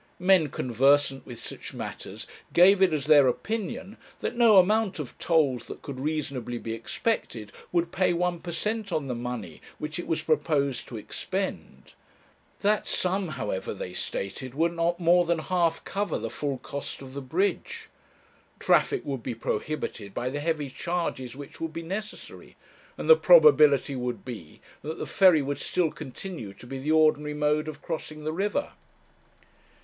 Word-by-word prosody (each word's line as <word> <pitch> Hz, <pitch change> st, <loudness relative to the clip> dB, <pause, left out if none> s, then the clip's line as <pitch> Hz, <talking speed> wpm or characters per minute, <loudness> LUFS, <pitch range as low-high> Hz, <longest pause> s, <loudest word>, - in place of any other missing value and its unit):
Men 180 Hz, -4 st, +4 dB
conversant 135 Hz, +3 st, +2 dB
with 120 Hz, -2 st, -8 dB
such -, -, -7 dB
matters -, -, -7 dB, 0.3 s
gave 185 Hz, +3 st, +6 dB
it 190 Hz, -2 st, +5 dB
as 150 Hz, -3 st, -1 dB
their 145 Hz, -3 st, +7 dB
opinion 200 Hz, -, -3 dB, 0.2 s
that -, -, -3 dB
no 230 Hz, -4 st, +6 dB
amount 210 Hz, +2 st, +4 dB
of 150 Hz, -6 st, -6 dB
tolls 150 Hz, -7 st, +2 dB
that -, -, -9 dB
could 135 Hz, -3 st, -6 dB
reasonably 140 Hz, -5 st, -3 dB
be 115 Hz, -1 st, -5 dB
expected 115 Hz, -, -3 dB, 0.2 s
would 170 Hz, -1 st, +1 dB
pay 185 Hz, -1 st, +2 dB
one 175 Hz, 0 st, 0 dB
per 175 Hz, 0 st, -6 dB
cent 210 Hz, +4 st, -2 dB
on 155 Hz, -4 st, -1 dB
the 130 Hz, -, -3 dB
money 120 Hz, -9 st, -5 dB, 0.2 s
which 150 Hz, +3 st, -5 dB
it -, -, -5 dB
was 165 Hz, -, -1 dB
proposed 145 Hz, -4 st, 0 dB
to 115 Hz, -, -7 dB
expend; 190 Hz, -, -5 dB, 0.7 s
that 210 Hz, +1 st, +2 dB
sum, 185 Hz, +1 st, 0 dB
however, 105 Hz, -4 st, -3 dB
they 90 Hz, -2 st, -6 dB
stated, 120 Hz, +8 st, -4 dB
would 165 Hz, +3 st, +1 dB
not 170 Hz, +1 st, 0 dB
more 175 Hz, +1 st, +5 dB
than 170 Hz, 0 st, +1 dB
half 165 Hz, 0 st, 0 dB
cover 205 Hz, +1 st, -2 dB
the -, -, -5 dB
full 140 Hz, -2 st, -3 dB
cost 140 Hz, +1 st, -6 dB
of 130 Hz, -1 st, -10 dB
the 140 Hz, -, -5 dB
bridge. 175 Hz, +9 st, -1 dB, 0.7 s
Traffic -, -, +2 dB
would 135 Hz, -4 st, -3 dB
be 120 Hz, 0 st, -4 dB
prohibited 110 Hz, -3 st, -4 dB
by 125 Hz, +1 st, -2 dB
the 145 Hz, -, -3 dB
heavy 150 Hz, -3 st, -2 dB
charges 150 Hz, -7 st, -3 dB
which 140 Hz, 0 st, -10 dB
would 165 Hz, -1 st, -3 dB
be 165 Hz, +1 st, -5 dB
necessary, 210 Hz, +5 st, -7 dB, 0.4 s
and -, -, -5 dB
the 475 Hz, -, +10 dB
probability 150 Hz, -, +6 dB
would 125 Hz, -4 st, -4 dB
be 105 Hz, -11 st, -9 dB, 0.2 s
that 155 Hz, +2 st, -5 dB
the -, -, -4 dB
ferry 180 Hz, -7 st, +5 dB
would 140 Hz, 0 st, -3 dB
still 170 Hz, 0 st, 0 dB
continue 135 Hz, -, -7 dB
to 110 Hz, -, -14 dB
be 135 Hz, +2 st, -6 dB
the 145 Hz, +4 st, -1 dB
ordinary 155 Hz, -1 st, +3 dB
mode 150 Hz, +1 st, +1 dB
of 150 Hz, -2 st, -7 dB
crossing 155 Hz, -2 st, -5 dB
the 155 Hz, +1 st, -2 dB
river. 205 Hz, -, -1 dB
155 Hz, 165 wpm, -27 LUFS, 130-180 Hz, 0.7 s, the